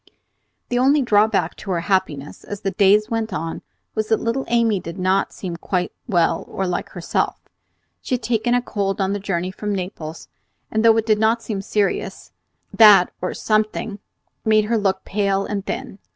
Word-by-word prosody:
The 245 - +1
only 275 +3 +4
drawback 205 -6 +2
to 200 - -9
her 175 -3 0
happiness, 170 -6 -1
as 205 -1 -7
the 195 - -1
days 210 +3 +3
went 225 -1 -1
on, 165 -3 -4 0.3
was 215 -1 -1
that 220 - +2
little 230 +4 -1
Amy 230 -4 +2
did 170 +1 -8
not 190 +1 +1
seem 175 -3 -6
quite 180 +1 -2 0.2
well 175 -7 +2
or 195 - -3
like 180 -1 -2
herself. 175 -2 -2 0.6
She 255 - -1
had 250 - -6
taken 240 +1 +1
a 245 - +1
cold 200 -4 -2
on 195 0 +1
the 205 - -2
journey 185 -2 -2
from 205 +1 -3
Naples, 175 -4 -6 0.4
and 220 0 +1
though 225 -1 +6
it 225 - +1
did 215 -2 +2
not 225 +2 +2
seem 205 -4 -3
serious, 200 0 -2 0.4
that, 205 -5 +7
or 180 - -3
something, 215 -1 -1 0.4
made 215 -1 +3
her 230 +2 +1
look 195 -2 0
pale 195 -1 0
and 200 -2 -3
thin. 195 - -5
205 Hz, 180 wpm, -21 LUFS, 190-220 Hz, 0.6 s, that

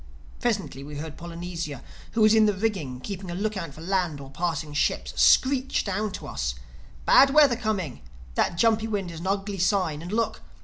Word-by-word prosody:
Presently 200 - -2
we 145 +1 -8
heard 155 +1 -6
Polynesia, 170 -4 -6 0.3
who 225 - +1
was 215 0 +6
in 220 -1 +6
the 205 - +1
rigging 185 - -2
keeping 190 +3 -6
a 175 - -4
look 215 +3 -1
out 165 -7 -5
for 160 - -11
land 180 -4 -1
or 135 -1 -10
passing 160 -1 -2
ships, 150 - 0
screech 270 0 +4
down 205 +1 -1
to - - -7
us, - - -3 0.5
"Bad 275 +1 +7
weather 285 -3 +6
coming. 210 - -3 0.3
That 170 - 0
jumpy 225 +1 +3
wind 200 -5 -2
is 165 - -8
an 175 - -5
ugly 195 0 -1
sign. 180 -5 +1
And 175 +3 -7
look! 220 0 -1
190 Hz, 190 wpm, -26 LUFS, 160-215 Hz, 0.5 s, Bad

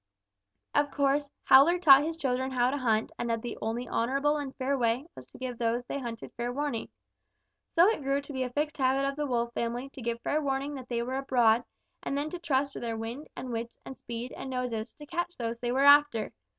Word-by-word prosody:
"Of 290 0 +2
course, 280 +1 +1
Howler 290 +7 +7
taught 280 -6 +8
his 320 +2 -3
children 260 -3 -1
how 250 -1 +2
to 285 - -1
hunt 225 -4 +1
and 240 - -2
that 230 0 -1
the 240 - -4
only 230 +3 -2
honorable 275 +5 +1
and 280 -2 -5
fair 270 +1 0
way 240 +1 +1
was - - -11
to - - -15
give 250 -2 -5
those 235 +1 0
they 280 - -4
hunted 235 -3 -7
fair 240 +1 -3
warning. 280 -3 -3 0.9
So 340 +1 +7
it 435 -8 +1
grew 275 0 +1
to 285 +1 -9
be 260 - -2
a 255 - -1
fixed 295 +3 -2
habit 270 +1 +2
of 275 - -2
the 295 0 -2
Wolf 235 -2 -1
family 240 +3 -3
to 270 - -11
give 235 0 -2
fair 305 - 0
warning 275 0 -1
that 260 -3 -8
they 235 -1 -1
were 260 +2 -3
abroad 240 -4 +3 0.4
and 275 - -2
then 295 +2 -2
trust 280 -6 -1
to - - -6
their 230 -1 -3
wind 230 +7 -6
and 250 0 -6
wits 230 0 -4
and 265 - -7
speed 240 +1 -6
and 270 - -7
noses 250 -4 -3
to 300 - -11
catch 345 +3 -3
those 230 -1 -3
they 240 0 -2
were 270 +2 +2
after. 285 -6 +5
260 Hz, 230 wpm, -29 LUFS, 235-285 Hz, 0.9 s, taught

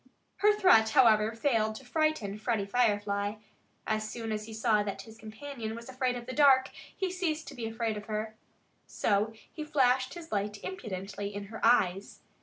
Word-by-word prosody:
Her 420 +1 +5
threat, 365 - +5
however, 220 -4 +5
failed 225 -3 +1
to 260 - -10
frighten 245 -8 0
Freddie 220 -2 0
Firefly. 205 -2 +1 0.5
As 215 0 -1
soon 225 0 -5
as 215 0 -3
he 220 - -9
saw 215 -1 +2
that 205 -1 -4
his 220 -1 -13
companion 220 +1 -7
was 235 +2 -9
afraid 255 -1 -1
of 240 -1 -6
the 255 - -6
dark, 270 -3 +5 0.3
he 380 -2 -1
ceased 330 -4 -2
to - - -10
be 230 -2 -4
afraid 225 -1 -2
of 210 - -7
her. 215 0 -4 0.5
So 210 +1 +1 0.2
he 310 - -5
flashed 260 -2 +2
his 340 -2 -10
light 205 0 -1
impudently 200 - -5
in 205 - -4
her 225 - -8
eyes. 195 -4 +2
225 Hz, 180 wpm, -30 LUFS, 210-260 Hz, 0.5 s, Her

